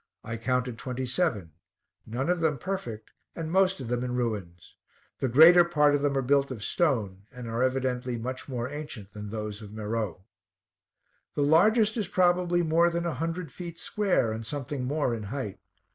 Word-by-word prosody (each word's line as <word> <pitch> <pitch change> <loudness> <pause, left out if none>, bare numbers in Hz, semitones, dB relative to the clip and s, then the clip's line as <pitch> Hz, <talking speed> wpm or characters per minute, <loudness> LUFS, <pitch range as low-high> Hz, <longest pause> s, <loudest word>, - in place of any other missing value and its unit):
I 115 - -4
counted 125 0 -1
twenty 130 0 -3
seven, 120 - 0 0.6
none 120 +6 -2
of 180 0 +1
them 160 -3 +1
perfect, 120 - -5 0.2
and 160 -1 -4
most 190 -1 +3
of 130 - -6
them 120 +1 -1
in 125 -1 -2
ruins; 100 -8 -4 0.4
the 130 - 0
greater 165 +8 +8
part 150 -4 +3
of 145 - +2
them 140 -1 +1
are 135 - +1
built 140 +2 +2
of 120 -5 -6
stone, 105 - 0
and 125 -2 -8
are 115 +2 -2
evidently 130 -1 0
much 130 +4 -5
more 120 -2 -2
ancient 135 -8 -8
than 105 -1 -7
those 105 0 -5
of 105 -1 -10
Meroe. 110 -4 -3 1.1
The 145 - +1
largest 210 +9 +4
is 210 -5 -1
probably 175 -1 +2
more 165 +2 +4
than 170 0 -2
a 170 - -1
hundred 165 +2 -3
feet 170 +1 -8
square, 190 - +1
and 110 +1 -4
something 135 +2 -4
more 145 -2 0
in 115 - -4
height. 125 -6 -4
130 Hz, 180 wpm, -28 LUFS, 115-165 Hz, 1.1 s, greater